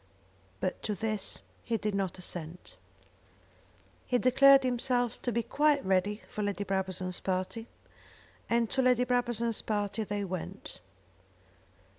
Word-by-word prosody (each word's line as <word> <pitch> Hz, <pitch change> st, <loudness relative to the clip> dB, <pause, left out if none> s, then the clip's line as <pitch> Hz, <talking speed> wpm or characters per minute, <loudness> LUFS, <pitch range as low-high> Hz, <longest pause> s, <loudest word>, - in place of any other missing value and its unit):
But 185 Hz, -, -2 dB
to 210 Hz, -, -2 dB
this 215 Hz, -2 st, -2 dB, 0.2 s
he 230 Hz, -2 st, 0 dB
did 210 Hz, -1 st, -2 dB
not 195 Hz, -3 st, -1 dB
assent. 175 Hz, -, -5 dB, 1.3 s
He 250 Hz, -, +3 dB
declared 270 Hz, +2 st, +6 dB
himself 245 Hz, -1 st, 0 dB
to 245 Hz, -, -1 dB
be 235 Hz, 0 st, 0 dB
quite 295 Hz, +3 st, +2 dB
ready 195 Hz, +3 st, +1 dB
for 215 Hz, -, -5 dB
Lady 205 Hz, 0 st, -1 dB
Brabazon's 185 Hz, -2 st, -2 dB
party, 190 Hz, +5 st, -2 dB, 0.8 s
and 235 Hz, 0 st, +3 dB
to 265 Hz, -, +2 dB
Lady 250 Hz, -1 st, +4 dB
Brabazon's 240 Hz, -2 st, 0 dB
party 210 Hz, 0 st, -1 dB
they 205 Hz, -1 st, -2 dB
went. 185 Hz, -3 st, -6 dB
215 Hz, 125 wpm, -30 LUFS, 190-245 Hz, 1.3 s, declared